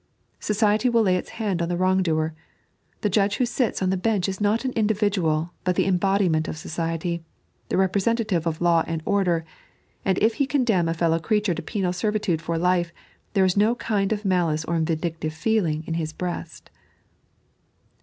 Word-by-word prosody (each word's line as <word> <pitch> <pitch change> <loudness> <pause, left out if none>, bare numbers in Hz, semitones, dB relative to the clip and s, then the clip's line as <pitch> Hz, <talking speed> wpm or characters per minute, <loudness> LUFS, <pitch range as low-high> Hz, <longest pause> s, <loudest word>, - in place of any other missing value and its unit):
Society 215 +3 +2
will 230 -1 +3
lay 185 -3 +3
its 180 - -3
hand 200 -6 -1
on 170 - -1
the 175 - -1
wrong 185 +1 +2
doer. 160 -2 0 0.7
The 210 - +1
judge 205 +1 +2
who 250 - +2
sits 240 -4 -1
on 185 - +2
the - - +1
bench 205 -1 0
is 190 +1 -4
not 210 +5 +1
an 260 - 0
individual, 200 -8 +1
but 180 -1 +1
the - - +2
embodiment 185 -3 +2
of - - -5
society, 165 +1 -3 0.5
the - - 0
representative 190 -1 +1
of 160 0 -2
law 170 -2 +4
and 165 -1 -3
order; 180 -5 +1 0.6
and 190 -1 +1
if 220 +2 +3
he 275 - +3
condemn 225 - +2
a 165 - -1
fellow 165 0 +1
creature 210 +2 +1
to - - -5
penal 190 -4 -2
servitude 210 -4 -1
for 165 0 -2
life, 175 0 +1 0.4
there 195 -2 +4
is 185 - +1
no 215 +4 +3
kind 205 -5 -1
of 210 -1 -2
malice 170 -5 +1
or 170 0 0
vindictive 160 -1 -2
feeling 165 -4 0
in 165 - -3
his 160 -1 -3
breast. 175 +1 -6
185 Hz, 185 wpm, -24 LUFS, 165-210 Hz, 0.7 s, law